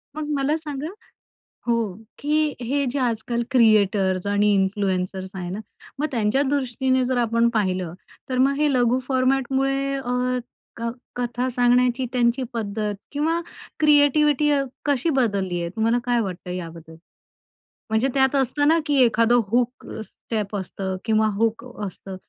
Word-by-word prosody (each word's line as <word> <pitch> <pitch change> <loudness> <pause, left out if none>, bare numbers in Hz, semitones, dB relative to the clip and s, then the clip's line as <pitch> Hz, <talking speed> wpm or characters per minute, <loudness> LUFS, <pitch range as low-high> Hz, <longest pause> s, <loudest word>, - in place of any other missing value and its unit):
मग 305 -1 -4
मला 280 +3 +1
सांगा 300 -1 -5 0.8
हो, 230 -5 0 0.2
की 300 0 +1
हे 280 +4 0
जे 280 - -2
आजकाल 235 -1 -1
क्रिएटर्स 205 -6 +3
आणि 205 0 +3
इन्फ्लुएन्सर्स 190 -1 -1
आहे 180 -2 -5
ना, 195 - -4 0.4
मग 305 - +2
त्यांच्या 230 +2 +1
दृष्टीने 260 -1 +1
जर 255 0 0
आपण 230 0 +2
पाहिलं 185 -5 0 0.3
तर 255 -1 -1
मग 270 +2 +4
हे 295 -1 +2
लघु 245 0 +3
फॉर्मॅटमुळे 270 +1 +1
अ, 250 -1 -1 0.4
क 230 0 -2 0.3
कथा 245 +1 -1
सांगण्याची 245 +1 +2
त्यांची 245 +1 +2
पद्धत 210 -2 -2 0.2
किंवा 320 +4 0 0.4
क्रिएटिव्हिटी 295 0 +4
अ, 280 -1 +3 0.2
कशी 285 +2 +1
बदलली 200 - 0
आहे? 170 - -2
तुम्हाला 230 +2 +2
काय 240 -1 +2
वाटतं 185 -3 -5
याबद्दल? 165 -2 -7 0.9
म्हणजे 220 +4 +2
त्यात 265 0 +3
असतं 285 +2 +1
ना 325 +1 +5
की 295 - 0
एखादं 230 +1 +4
हूक 245 +3 0 0.2
स्टेप 210 -2 -5
असतं 190 0 -4
किंवा 220 -1 +3
हूक 225 +4 0 0.2
असतं. 190 0 -8
240 Hz, 140 wpm, -23 LUFS, 210-270 Hz, 0.9 s, ना